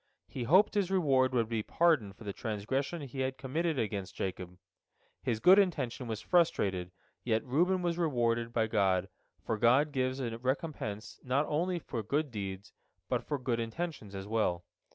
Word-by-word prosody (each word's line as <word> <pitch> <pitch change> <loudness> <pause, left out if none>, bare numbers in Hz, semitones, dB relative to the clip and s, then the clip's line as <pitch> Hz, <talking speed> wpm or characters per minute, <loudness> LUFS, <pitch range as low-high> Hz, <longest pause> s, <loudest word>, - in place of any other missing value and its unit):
He 125 - -5
hoped 185 - +5
his 200 -4 +1
reward 135 -9 +3
would 120 -3 +1
be 115 -1 -1
pardon 150 -6 +2
for 100 - -14
the 100 -1 -4
transgression 130 - -3
he 135 0 -7
had 130 0 -1
committed 160 +4 -1
against 100 -5 -3
Jacob. 90 -1 -4 0.6
His 115 -3 -1
good 185 - +7
intention 140 - 0
was 110 -2 -4
frustrated, 95 - +1 0.3
yet 115 -2 0
Reuben 175 +8 +2
was 175 0 0
rewarded 120 -7 +1
by 115 -1 +1
God, 95 -4 +1 0.4
for 110 -2 -1
God 130 +6 +4
gives 130 -1 -1
a 115 -3 -3
recompense 130 -5 -3
not 135 +3 +1
only 175 +5 0
for 125 -8 -4
good 145 +6 -1
deeds, 100 -1 -6 0.4
but - - 0
for 145 - -2
good 125 -3 -1
intentions 115 - -4
as 95 0 -5
well. 105 -6 0
125 Hz, 170 wpm, -31 LUFS, 110-150 Hz, 0.6 s, good